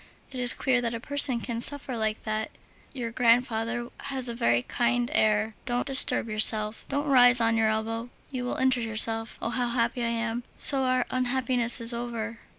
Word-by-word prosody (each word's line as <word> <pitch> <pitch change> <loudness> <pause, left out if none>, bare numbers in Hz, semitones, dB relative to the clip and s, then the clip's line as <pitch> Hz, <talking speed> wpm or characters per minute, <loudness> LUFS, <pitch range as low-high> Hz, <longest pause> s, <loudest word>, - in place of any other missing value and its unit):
It 260 - -7
is 245 -1 +4
queer 255 -2 0
that 235 -1 -3
a - - -6
person 275 -1 +5
can 230 0 -5
suffer 280 -1 +1
like 220 -1 -3
that. 215 0 -4 0.4
Your 240 -4 -6
grandfather 235 0 0 0.2
has 265 -2 -2
a 235 - -2
very 120 - 0
kindly 245 - -2
air. 215 -4 +1
Don't 245 0 -2
disturb 265 -4 +4
yourself, 215 0 +3
don't 285 +1 -3
rise 250 -3 +4
on 230 0 +1
your 220 -1 +1
elbow, 225 +2 -4 0.2
you 255 -2 -5
will 245 - -4
injure 260 -1 0
yourself. 225 0 -2
Oh! 230 - -3
how 245 0 -2
happy 235 0 -2
I 235 - -1
am! 230 0 -3 0.2
So 270 -2 +4
our 255 -1 0
unhappiness 250 -1 0
is 230 +1 -1
over! 230 -1 -6
235 Hz, 185 wpm, -25 LUFS, 225-255 Hz, 0.4 s, person